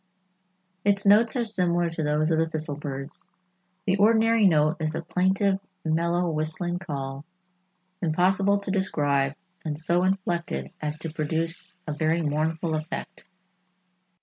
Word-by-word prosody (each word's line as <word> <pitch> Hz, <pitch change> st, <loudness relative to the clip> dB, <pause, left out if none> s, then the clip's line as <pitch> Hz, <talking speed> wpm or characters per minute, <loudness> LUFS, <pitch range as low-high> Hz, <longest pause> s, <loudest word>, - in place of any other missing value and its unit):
Its 200 Hz, 0 st, +2 dB
notes 215 Hz, +5 st, +5 dB
are 245 Hz, -, +1 dB
similar 175 Hz, -5 st, +2 dB
to 165 Hz, -1 st, -3 dB
those 150 Hz, +1 st, +1 dB
of 160 Hz, -, +2 dB
the 165 Hz, 0 st, +1 dB
thistle 155 Hz, -2 st, -2 dB
birds. 140 Hz, 0 st, -5 dB, 0.6 s
"The 190 Hz, 0 st, +2 dB
ordinary 220 Hz, +1 st, +4 dB
note 155 Hz, -1 st, +3 dB
is 155 Hz, -1 st, -1 dB
a 165 Hz, -, -3 dB
plaintive 190 Hz, +3 st, +1 dB, 0.3 s
mellow, 170 Hz, +2 st, +1 dB
whistling 160 Hz, +3 st, -2 dB
call, 140 Hz, -5 st, -5 dB, 0.8 s
impossible 190 Hz, +4 st, +2 dB
to 200 Hz, -, -3 dB
describe 145 Hz, -8 st, +1 dB, 0.3 s
and 150 Hz, -2 st, -3 dB
so 170 Hz, +3 st, +1 dB
inflected 175 Hz, -, -1 dB
as 150 Hz, 0 st, -2 dB
to 160 Hz, 0 st, -6 dB
produce 165 Hz, +2 st, -2 dB
a 150 Hz, -, -3 dB
very 160 Hz, +2 st, +1 dB
mournful 160 Hz, +2 st, -1 dB
effect." 155 Hz, +2 st, -5 dB
165 Hz, 135 wpm, -26 LUFS, 155-190 Hz, 0.8 s, notes